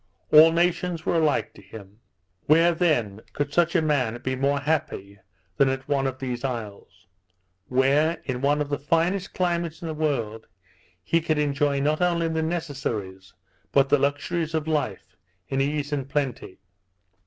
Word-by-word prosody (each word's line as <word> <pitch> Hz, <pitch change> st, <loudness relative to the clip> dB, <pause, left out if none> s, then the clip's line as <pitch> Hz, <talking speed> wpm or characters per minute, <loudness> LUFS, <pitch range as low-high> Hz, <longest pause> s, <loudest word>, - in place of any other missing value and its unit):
All 155 Hz, +2 st, +8 dB
nations 170 Hz, 0 st, 0 dB
were -, -, +1 dB
alike 155 Hz, -2 st, +1 dB
to -, -, -15 dB
him. 105 Hz, -1 st, -13 dB, 0.5 s
Where 165 Hz, +3 st, +5 dB
then 120 Hz, -, 0 dB
could 145 Hz, 0 st, -3 dB
such 170 Hz, 0 st, +2 dB
a 165 Hz, -, +3 dB
man 125 Hz, -7 st, 0 dB
be 130 Hz, 0 st, -1 dB
more 140 Hz, +2 st, +1 dB
happy 135 Hz, -10 st, -3 dB, 0.4 s
than 135 Hz, -, +4 dB
at 135 Hz, 0 st, -4 dB
one 140 Hz, -2 st, +1 dB
of 130 Hz, -, -4 dB
these 125 Hz, -2 st, -5 dB
isles? 115 Hz, -6 st, -6 dB, 0.6 s
where, 140 Hz, +6 st, +2 dB
in 125 Hz, -2 st, -3 dB
one 145 Hz, +2 st, +2 dB
of 145 Hz, -, -3 dB
the 145 Hz, 0 st, -2 dB
finest 170 Hz, +6 st, 0 dB
climates 170 Hz, -3 st, -1 dB
in -, -, -4 dB
the 160 Hz, -, -3 dB
world, 120 Hz, -8 st, -2 dB, 0.6 s
he 165 Hz, -, +1 dB
could 155 Hz, -1 st, 0 dB
enjoy 145 Hz, -1 st, +1 dB
not 150 Hz, +4 st, 0 dB
only 170 Hz, -2 st, +1 dB
the 160 Hz, 0 st, -1 dB
necessaries, 135 Hz, -, -4 dB, 0.4 s
but 135 Hz, -1 st, +3 dB
the 145 Hz, 0 st, +4 dB
luxuries 155 Hz, +4 st, -1 dB
of 160 Hz, -1 st, -2 dB
life, 145 Hz, -11 st, -2 dB, 0.3 s
in 135 Hz, 0 st, 0 dB
ease 145 Hz, +1 st, -1 dB
and 135 Hz, -2 st, -3 dB
plenty. 135 Hz, -10 st, -3 dB
145 Hz, 165 wpm, -25 LUFS, 130-160 Hz, 0.6 s, All